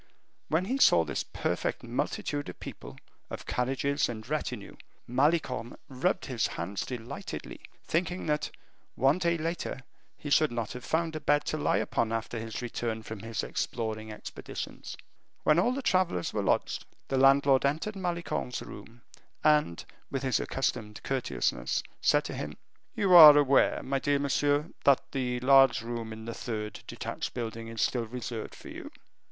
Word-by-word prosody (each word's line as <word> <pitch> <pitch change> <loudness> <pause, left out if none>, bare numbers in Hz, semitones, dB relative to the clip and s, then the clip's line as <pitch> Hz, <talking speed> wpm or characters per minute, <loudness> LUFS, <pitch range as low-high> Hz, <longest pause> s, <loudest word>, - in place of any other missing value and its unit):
When 165 +4 +1
he 260 +7 -1
saw 85 - +6
this - - -2
perfect - - -2
multitude 145 +3 -2
of - - -10
people, - - -9 0.3
of - - -7
carriages, 135 +3 0
and 110 -2 -6
retinue, 125 -7 -3 0.3
Malicorne 130 -2 +1
rubbed 145 +9 0
his 125 -4 0
hands 95 +4 -4
delightedly, 120 -2 -6 0.3
thinking 175 +2 -1
that, 150 -1 0 0.5
one 135 +7 +3
day 170 -1 +1
later, 165 -3 -3 0.4
he 145 - -7
should 155 -1 +4
not 115 -3 -3
have 125 0 -8
found 160 0 -1
a - - -2
bed 145 0 +2
to 155 - -1
lie - - +2
upon 115 -1 0
after 115 +1 -3
his 115 +2 -5
return 115 -2 -3
from 110 -1 -7
his 115 +2 -4
exploring 110 -2 -3
expeditions. 105 - -7 0.5
When 155 +2 +4
all 240 - +3
the 270 +1 -3
travelers 185 - +1
were - - 0
lodged, - - 0 0.3
the 135 - +1
landlord 135 0 +5
entered 155 +10 0
Malicorne's 170 -8 -3
room, 115 0 -12 0.4
and 150 - +3 0.2
with 135 -1 -3
his 130 -1 +2
accustomed 110 -5 -2
courteousness, 125 - -1 0.2
said - - +4
to - - -5
him, - - -5 0.4
"You 195 -2 +2
are 155 -4 +12
aware, 140 -2 +4
my 135 0 -1
dear 145 +1 +2
monsieur, 145 +2 +1
that 140 -2 +3
the 125 -2 -1
large 135 -2 +6
room 115 -1 -4
in 110 0 -8
the 115 - -4
third 105 -3 -5
detached - - -5
building 115 -1 -4
is 115 -1 -2
still 120 -3 0
reserved 120 -1 -5
for - - -11
you?" - - -8
130 Hz, 160 wpm, -29 LUFS, 115-150 Hz, 0.5 s, are